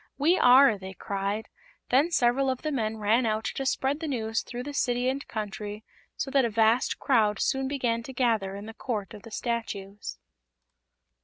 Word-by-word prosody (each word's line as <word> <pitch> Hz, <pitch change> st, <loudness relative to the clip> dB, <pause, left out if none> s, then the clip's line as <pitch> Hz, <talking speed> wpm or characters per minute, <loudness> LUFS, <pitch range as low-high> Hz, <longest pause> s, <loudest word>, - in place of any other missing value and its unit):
"We 310 Hz, +6 st, +4 dB
are!" 250 Hz, -, +6 dB
they 190 Hz, 0 st, -8 dB
cried. 200 Hz, +2 st, -3 dB, 0.4 s
Then 275 Hz, +7 st, +4 dB
several 265 Hz, -3 st, +2 dB
of 260 Hz, -1 st, -3 dB
the 310 Hz, -, -1 dB
men 220 Hz, -5 st, -1 dB
ran 220 Hz, +3 st, +2 dB
out 215 Hz, 0 st, 0 dB
to 270 Hz, -, -3 dB
spread 270 Hz, +3 st, 0 dB
the 320 Hz, -, -4 dB
news 225 Hz, -5 st, -1 dB
throughout 245 Hz, +1 st, -7 dB
the 290 Hz, -, -5 dB
City 245 Hz, -2 st, 0 dB
and 275 Hz, +1 st, -3 dB
Country, 210 Hz, 0 st, -5 dB, 0.3 s
so 270 Hz, -, -3 dB
that 275 Hz, -1 st, +4 dB
a 235 Hz, -, +1 dB
vast 225 Hz, +2 st, +2 dB
crowd 215 Hz, -5 st, +2 dB
soon 265 Hz, 0 st, 0 dB
began 245 Hz, -4 st, -1 dB
to 265 Hz, +3 st, -9 dB
gather 225 Hz, -6 st, +1 dB
in 200 Hz, +1 st, -7 dB
the 225 Hz, -, -8 dB
Court 220 Hz, -4 st, -4 dB
of 210 Hz, -, -10 dB
the 230 Hz, -, -12 dB
Statues. 205 Hz, -, -4 dB
235 Hz, 185 wpm, -27 LUFS, 215-265 Hz, 0.4 s, are